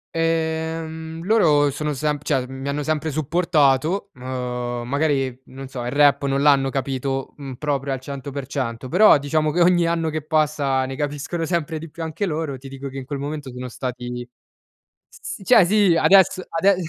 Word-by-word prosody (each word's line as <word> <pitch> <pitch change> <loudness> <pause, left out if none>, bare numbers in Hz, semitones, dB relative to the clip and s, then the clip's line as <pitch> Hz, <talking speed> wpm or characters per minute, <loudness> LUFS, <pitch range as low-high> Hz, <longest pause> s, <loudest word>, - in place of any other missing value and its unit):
Ehm, 160 0 -2
loro 155 -9 +4
sono 150 +2 -3
semp 150 +1 -2
cioè, 130 -1 0
mi 135 +1 -7
hanno 145 +1 -1
sempre 155 +1 -1
supportato. 155 +3 +1
Uhm, 125 -1 -4
magari, 135 -3 0
non 135 0 -9
so: 125 -2 -6
il 120 - -3
rap 145 0 +4
non 135 0 0
l'hanno 135 -2 +4
capito, 135 0 -3
mhmm, 135 -2 -7
proprio 140 -1 -2
al 130 - -3
100%. 135 -3 -5
Però, 200 -2 +7
diciamo 155 +2 0
che 175 +3 +1
ogni 175 -1 +4
anno 165 -1 0
che 155 -1 -3
passa, 150 -4 +1
ne 135 0 -5
capiscono 150 +3 -3
sempre 165 -2 -1
di 160 -1 -9
più 165 - -9
anche 165 +5 -2
loro. 155 -5 -3
Ti 135 +2 -11
dico 135 0 -7
che 135 - -9
in 130 - -6
quel 140 0 -5
momento, 145 -2 -5
sono 125 0 -6
stati 125 -1 -5 0.8
s - - -18
s 360 - -5
d - - -9
cioè 245 -6 +7
sì. 195 -2 +4
Adesso 185 +1 +5
ade 190 +4 +3
145 Hz, 180 wpm, -22 LUFS, 135-160 Hz, 0.8 s, Però